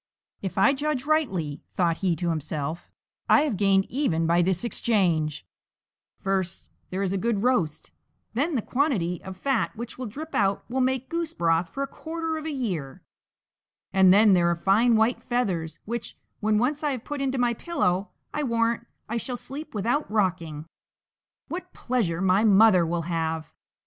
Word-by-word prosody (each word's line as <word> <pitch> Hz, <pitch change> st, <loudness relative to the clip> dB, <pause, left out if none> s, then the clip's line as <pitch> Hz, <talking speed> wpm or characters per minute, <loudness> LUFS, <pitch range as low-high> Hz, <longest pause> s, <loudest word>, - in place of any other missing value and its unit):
"If 190 Hz, -, -5 dB
I 230 Hz, +9 st, +5 dB
judge 285 Hz, -1 st, -2 dB
rightly," 195 Hz, -, 0 dB
thought 170 Hz, -3 st, +2 dB
he 180 Hz, -3 st, +1 dB
to 170 Hz, +2 st, -2 dB
himself, 155 Hz, +1 st, -4 dB, 0.4 s
"I -, -, +7 dB
have 295 Hz, -7 st, 0 dB
gained 195 Hz, 0 st, +3 dB
even 205 Hz, -, 0 dB
by 170 Hz, +1 st, +3 dB
this 180 Hz, +2 st, 0 dB
exchange: 175 Hz, -, 0 dB, 0.7 s
first 190 Hz, -2 st, -2 dB, 0.2 s
there 190 Hz, +2 st, -2 dB
is 190 Hz, -1 st, -1 dB
a 195 Hz, -, 0 dB
good 225 Hz, -1 st, 0 dB
roast; 200 Hz, -12 st, 0 dB, 0.4 s
then 290 Hz, +7 st, 0 dB
the 230 Hz, -, 0 dB
quantity 225 Hz, -, 0 dB
of 190 Hz, -1 st, -8 dB
fat 270 Hz, 0 st, 0 dB
which 235 Hz, +2 st, -7 dB
will 255 Hz, -, -3 dB
drip 305 Hz, +9 st, -8 dB
out 195 Hz, -1 st, +1 dB
will 260 Hz, +2 st, -1 dB
make 260 Hz, 0 st, 0 dB
goose 335 Hz, -1 st, -3 dB
broth 165 Hz, 0 st, +1 dB
for 275 Hz, -, -3 dB
a -, -, -3 dB
quarter 325 Hz, +2 st, -4 dB
of 310 Hz, -, -6 dB
a -, -, -2 dB
year; 180 Hz, -, -4 dB, 0.9 s
and 190 Hz, -1 st, +6 dB
then 205 Hz, +1 st, +6 dB
there 175 Hz, -2 st, +4 dB
are 170 Hz, -, +2 dB
fine 215 Hz, +7 st, +3 dB
white 220 Hz, +3 st, +2 dB
feathers, 185 Hz, -11 st, -1 dB
which, 235 Hz, +1 st, -5 dB, 0.2 s
when 215 Hz, 0 st, +2 dB
once 280 Hz, +7 st, 0 dB
I 295 Hz, -2 st, +1 dB
have 245 Hz, -3 st, -6 dB
put 290 Hz, -2 st, -4 dB
into 270 Hz, -1 st, 0 dB
my 245 Hz, -1 st, +2 dB
pillow 200 Hz, -, -1 dB, 0.2 s
I 300 Hz, -, -1 dB
warrant 230 Hz, -2 st, 0 dB, 0.2 s
I 235 Hz, -, -2 dB
shall 245 Hz, +1 st, -3 dB
sleep 290 Hz, +2 st, -7 dB
without 240 Hz, +9 st, 0 dB
rocking. 175 Hz, -7 st, -1 dB, 0.8 s
What 360 Hz, +1 st, -6 dB
pleasure 205 Hz, -9 st, -1 dB
my 190 Hz, +2 st, +3 dB
mother 200 Hz, -4 st, +6 dB
will 170 Hz, 0 st, -1 dB
have!" 160 Hz, -1 st, -2 dB
210 Hz, 175 wpm, -26 LUFS, 175-260 Hz, 0.9 s, I